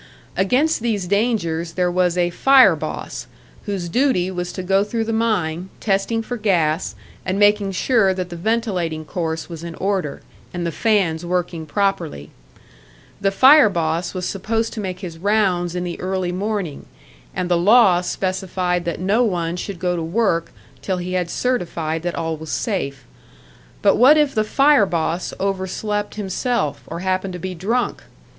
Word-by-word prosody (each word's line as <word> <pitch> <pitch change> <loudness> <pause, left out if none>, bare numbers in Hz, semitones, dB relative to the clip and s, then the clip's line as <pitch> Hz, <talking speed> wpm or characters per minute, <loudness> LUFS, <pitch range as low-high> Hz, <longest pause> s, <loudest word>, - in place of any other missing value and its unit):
Against 260 +11 +2
these 220 -5 -1
dangers 175 -5 0
there 180 0 +1
was 180 -1 +1
a 175 0 +2
"fire 270 +7 +6
boss," - - -6 0.4
whose 195 -4 -2
duty 190 -3 +1
was 180 -1 -4
to 185 - -5
go 195 +2 +3
through 225 +2 -2
the 225 0 -2
mine, 190 -6 0
testing 215 +3 0
for 245 +2 -4
gas, 175 -6 +1 0.3
and 185 +1 -2
making 205 -1 +3
sure 215 0 +3
that 185 -1 -3
the 175 - -7
ventilating 180 -6 -1
course 160 -1 -3
was 165 -2 -8
in 170 -1 -6
order, 190 -6 -2 0.3
and 175 -1 -2
the 170 - -1
fans 185 -6 +1
working 175 -2 -2
properly. 160 - -1 0.9
The 195 - +3
"fire 260 +5 +7
boss" 170 0 -1
was 180 -1 -3
supposed 225 +4 -2
to 225 - -5
make 185 -2 -4
his 170 -4 -7
rounds 185 -3 +1
in 180 - -2
the 175 -1 -5
early 185 -1 -1
morning, 195 -4 -3 0.5
and 180 - -1
the 175 - +2
law 190 0 +5
specified 185 -1 -2
that 170 -2 -3
no 200 +7 +2
one 175 -6 -1
should 190 +1 -5
go 180 0 -1
to 170 - -2
work 170 -1 0 0.3
till 190 -2 -2
he 180 +1 -4
had 180 -2 -1
certified 170 -11 -1
that 175 0 -3
all 165 0 -2
was 160 0 -8
safe. 140 - -2 0.8
But 200 - +4
what 275 +6 +7
if 295 -2 +2
the 215 - +2
"fire 275 -1 +4
boss" 170 0 -1
overslept 200 +2 -2
himself, 210 - -1
or 170 +2 -6
happened 185 0 -1
to 180 - -6
be 185 +2 -4
drunk? 220 +8 -1
185 Hz, 165 wpm, -21 LUFS, 170-210 Hz, 0.9 s, fire